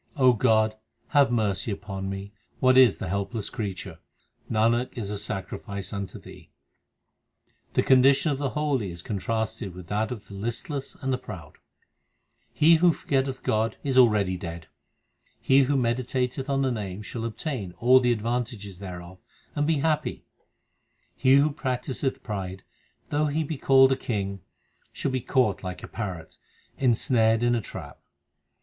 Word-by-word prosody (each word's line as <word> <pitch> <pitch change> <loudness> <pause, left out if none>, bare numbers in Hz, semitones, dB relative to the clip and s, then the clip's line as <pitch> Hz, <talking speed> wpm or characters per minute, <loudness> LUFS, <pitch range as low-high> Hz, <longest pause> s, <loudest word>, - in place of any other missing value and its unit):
O 130 -2 +6
God, 110 -2 +3 0.3
have 145 -3 +4
mercy 110 -3 0
upon 95 -1 -5
me; 100 +1 -6 0.3
what 130 0 +4
is 130 -5 +6
the - - -5
helpless 100 +3 -3
crea 100 -5 -3
ture? - - -9 0.5
Nanak 115 +3 +2
is 105 -4 -3
a 105 - -2
sacrifice 100 -1 -5
unto 100 -2 -5
Thee. - - -13 1.3
The - - +3
condition 135 +3 +5
of 140 - -2
the 140 -2 -1
holy 140 -9 0
is 85 0 -8
contrasted 110 -1 -3
with 90 -1 -9
that 110 +1 0
of 115 -5 -7
the - - -11
listless 120 +7 -4
and 135 -1 -2
the 125 - -1
proud: 95 -6 -10 0.9
He 165 +2 +5
who 175 +1 +5
forgetteth 135 -2 -1
God 110 +1 0
is 135 -2 -1
already 105 -7 +4
dead; 85 -3 -7 0.7
He 135 0 +4
who 140 +1 +1
meditateth 125 +2 -1
on 135 0 +1
the 130 - +1
Name 105 -3 -4
shall 115 +3 -6
obtain 115 - -4
all 125 +6 +5
the 125 -1 +2
ad 110 -3 -1
vantages 115 -5 -3
thereof, 90 -1 -8 0.3
and 145 0 0
be 155 -3 +2
happy; 155 -1 -1 0.9
He 130 +1 +4
who 145 +2 +4
practiseth 130 -1 -2
pride, 95 -3 -5 0.5
though 150 +1 +1
he 155 +2 0
be 150 -2 -5
called 135 0 +6
a - - +4
king, 100 -6 -3 0.5
shall 140 - -3
be 130 -1 -1
caught 125 -6 +1
like 90 -1 -6
a - - -6
parrot, 90 -7 -6 0.4
insnared 115 -2 +3
in 120 0 +3
a 120 - +1
trap. - - -9
115 Hz, 160 wpm, -26 LUFS, 100-130 Hz, 1.3 s, O